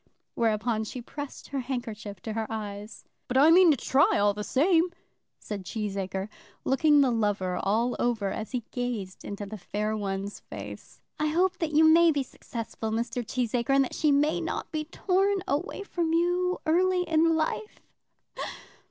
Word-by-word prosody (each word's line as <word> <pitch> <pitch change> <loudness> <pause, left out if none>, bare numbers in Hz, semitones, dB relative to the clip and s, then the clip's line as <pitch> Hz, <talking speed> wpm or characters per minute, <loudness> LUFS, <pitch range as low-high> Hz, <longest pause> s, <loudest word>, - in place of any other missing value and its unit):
Whereupon 220 0 0
she 235 +4 -6
pressed 285 +3 -8
her 275 - -2
handkerchief 225 -6 -5
to 220 - -4
her 220 0 -2
eyes. 210 -1 -6 0.2
"But 250 - 0
I 300 +4 +7
mean 360 0 +7
to 295 - +4
try 290 - +3
all 205 0 +3
the 210 +1 -5
same," 330 - +3 0.5
said 205 -3 -6
Cheesacre, 195 -1 -3 0.4
looking 290 +2 +4
the 265 -3 +3
lover 205 -5 0
all 230 +5 +1
over 220 -5 0
as 215 +2 -4
he 250 -3 -2
gazed 235 -7 -4
into 205 0 -5
the 210 +1 -8
fair 210 +4 -2
one's 200 -1 -3
face. - - -10 0.2
"I 305 - +1
hope 360 +4 +1
that 315 -2 -2
you 315 - +6
may 330 +1 +7
be 285 -3 0
successful, 230 -3 -6
Mr. 235 +2 -2
Cheesacre, 245 +2 0
and 275 - +5
that 260 - -5
she 305 -2 +2
may 295 +2 +2
not - - -4
be 310 -2 -2
torn 385 +3 +1
away 315 +8 -2
from 340 -4 -1
you 355 +2 +1
early 360 +3 +3
in 325 -1 +3
life. 320 +7 -2
250 Hz, 170 wpm, -28 LUFS, 215-320 Hz, 0.5 s, I